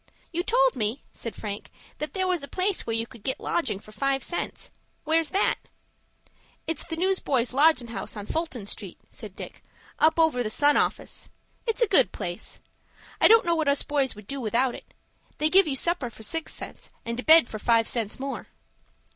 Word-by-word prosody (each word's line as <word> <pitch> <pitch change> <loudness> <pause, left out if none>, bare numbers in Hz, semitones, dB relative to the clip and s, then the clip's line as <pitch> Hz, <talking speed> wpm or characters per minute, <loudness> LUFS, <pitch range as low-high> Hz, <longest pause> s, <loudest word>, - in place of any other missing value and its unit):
"You 345 0 -1
told - - +3
me," 220 +4 -1
said 230 - -6
Frank, 205 -1 -6 0.3
"that 300 - -4
there 375 -1 0
was 365 -3 0
a 280 - -7
place 375 +3 -1
where 225 - 0
you 225 0 0
could 235 -2 -15
get 260 +5 -2
lodging 335 - -1
for 215 +2 -14
five 270 +4 0
cents. 345 - -3 0.3
Where's 320 0 +2
that?" 390 - +2 1.1
"It's 325 -3 -2
the 325 - -5
News 375 +3 +1
boys' 250 -3 0
Lodgin' 280 -4 +4
House, 230 - -5
on 205 - -6
Fulton 295 -7 -3
Street," - - -5
said - - -10
Dick, - - -9 0.4
"up 320 +1 +4
over 320 -6 +3
the 220 - -1
'Sun' 290 +6 +4
office. - - -1 0.4
It's 455 +2 +2
a - - +3
good 360 -10 +5
place. 175 -3 -6 0.6
I - - +8
don't 455 -1 +6
know 340 - +2
what 320 -3 0
us 280 0 +3
boys 275 -4 0
would 210 0 -12
do 275 +5 -5
without 240 +3 +1
it. - - -11 0.5
They 305 +1 +1
give 385 -2 +6
you 280 - -1
supper 285 -3 -1
for 220 - -12
six 325 +9 -3
cents, - - -7 0.2
and 235 +1 -3
a - - -3
bed 320 -4 +7
for 215 - -6
five 230 0 +3
cents 225 -2 -1
more." 275 +1 -5
275 Hz, 200 wpm, -26 LUFS, 230-330 Hz, 1.1 s, I